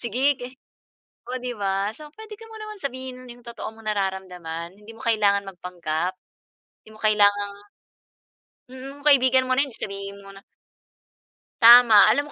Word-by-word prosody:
sige, 255 +4 0
ga 245 - -6 0.8
o 255 - -3
di 250 - -4
ba. 195 +1 -1
So 305 -1 -11
pwede 435 0 -11
ka 455 - -12
mo 445 - -11
naman 430 -1 -8
sabihin 260 -1 -7
yung 240 0 -14
totoo 235 - -7
mong 225 0 -17
nararamdaman. 185 -4 -4
Hindi 215 +2 -13
mo - - -17
kailangan 205 -3 +2
magpanggap, 180 -1 -4 0.7
di - - -17
mo - - -16
kailangang 205 -1 +2 1.2
Mm, 270 +2 -10
kung - - -19
kaibigan 260 -2 +4
mo 255 - +1
na 280 - +3
yun, 270 - -12
di - - -10
sabihin 200 0 -7
mo 195 - -14
na. 195 0 -14 1.2
Tama. 235 -2 +8
Alam 290 +1 +1
220 Hz, 165 wpm, -23 LUFS, 195-260 Hz, 1.2 s, Tama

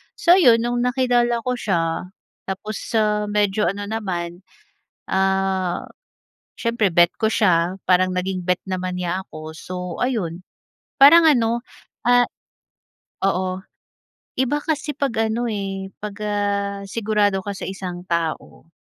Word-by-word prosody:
So 355 +3 +5
'yon, 230 -7 +5
no’ng 240 0 -1
nakilala 240 -2 +1
ko 250 - -1
siya, 165 -3 -1 0.4
tapos, 195 +2 -4 0.2
ah, 210 -1 +2
medyo 205 -2 +1
ano 205 +2 -3
naman, 175 -5 -3 0.7
ah, 190 -1 0 0.7
siyempre 230 -4 +1
bet 175 +1 +4
ko 220 - +3
siya, 180 -3 +2
parang 185 0 +4
naging 185 0 -2
bet 180 0 +1
naman 185 -1 -3
niya 180 +1 -2
ako, 155 -3 -10
so 185 +3 -8 0.3
ayon. 185 -9 -2 0.6
Parang 325 +5 +9
ano, 235 -6 +3 0.4
ah, 245 0 +4 1.0
oo, 185 -1 0 0.8
iba 265 +3 +2
kasi 310 -1 -1
'pag 230 -6 0
ano, 240 +2 -1
eh, 195 -2 -4
pag 210 -1 -5
ah, 200 -1 -1
sigurado 205 -2 +1
ka 205 - -2
sa - - -7
isang 180 -2 -6
tao. 165 -1 -3
200 Hz, 130 wpm, -22 LUFS, 185-230 Hz, 1.0 s, Parang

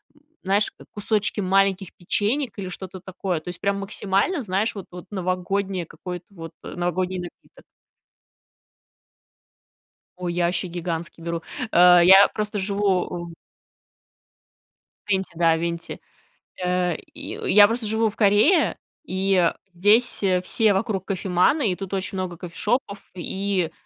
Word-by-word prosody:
м, 295 - -25 0.2
знаешь, 200 +3 +1 0.2
кусочки 210 0 0
маленьких 195 0 +1
печенек 215 +6 -1
или 190 -2 -5
что-то 185 0 -7
такое. 185 -2 -3
То 155 - -9
есть 175 - -8
прям 200 0 0
максимально, 200 - 0
знаешь, 210 +1 -1
вот 200 -3 -8
вот 180 0 -10
новогоднее, 185 0 -2
какое-то 180 +2 -8
вот 165 -3 -9
э, - - -8
новогодний 180 +1 -1
напиток. 175 - -11 2.5
Ой, 180 -1 -3
я 175 0 +1
ваще 180 +2 -1
гигантский 170 -1 -5
беру, 170 0 -3 0.3
э. 180 0 +7
Я 190 +3 +8
просто 210 0 -3
живу 200 -1 +1
в 170 -1 -6 1.8
Венти, 190 -1 0
да, 165 -1 +3
венти, 170 0 -4 0.6
э, 180 -2 +1 0.2
и. - - -7
Я 205 +1 +8
просто 230 +1 -1
живу 220 +1 +2
в 210 - -10
Корее, 215 - +4 0.3
и, 190 +1 0
э, 175 -2 +3 0.2
здесь, 210 +7 +3
э, 185 -2 +2
все 215 +2 +2
вокруг 195 -2 -1
кофеманы, 195 - +1
и - - -1
тут 195 +1 -7
очень 190 0 -3
много 180 -2 -4
кофешопов, 200 +4 -2 0.2
и 190 -1 -2
190 Hz, 135 wpm, -23 LUFS, 180-205 Hz, 2.5 s, Я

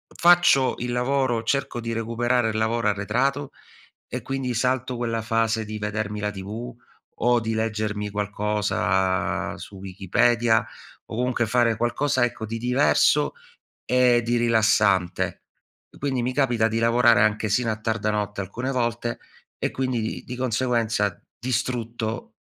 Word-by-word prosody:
faccio 175 -7 +5
il 125 0 -3
lavoro, 125 -1 +1
cerco 140 -2 -1
di 115 0 -4
recuperare 115 +1 0
il 110 - -2
lavoro 110 +1 0
arretrato 125 +8 -1 0.6
e, - - -5
quindi, 135 -2 -2
salto 125 +1 0
quella 115 -1 -2
fase 115 0 0
di 110 +1 -5
vedermi 105 0 -3
la 105 0 -1
TV 105 +5 -7 0.5
o 120 0 +4
di 110 0 -2
leggermi 105 -2 -2
qualcosa 100 -3 0
su 100 - -10
Wikipedia 110 +5 +1 0.4
o - - -7
comunque 125 0 0
fare 115 0 +2
qualcosa, 130 +3 +1
ecco, 115 -2 -5
di 115 +2 -4
diverso 125 +4 +3 0.5
e 125 -1 +3
di 120 +1 0
rilassante. 110 -5 +2 0.6
Quindi 135 -3 -1
mi 125 +2 -1
capita 120 -5 +2
di 115 0 -1
lavorare 115 -1 +4
anche 110 0 +1
sino 115 +3 +1
a 110 - -1
tarda 110 -1 -1
notte 105 -1 -2
alcune 120 +7 -4
volte 120 -1 -1 0.4
e - - -1
quindi 130 -2 -1
di 110 - -4
di 125 - -6
conseguenza, 115 -4 0 0.2
distrutto, 120 -1 -3
115 Hz, 140 wpm, -24 LUFS, 105-125 Hz, 0.6 s, faccio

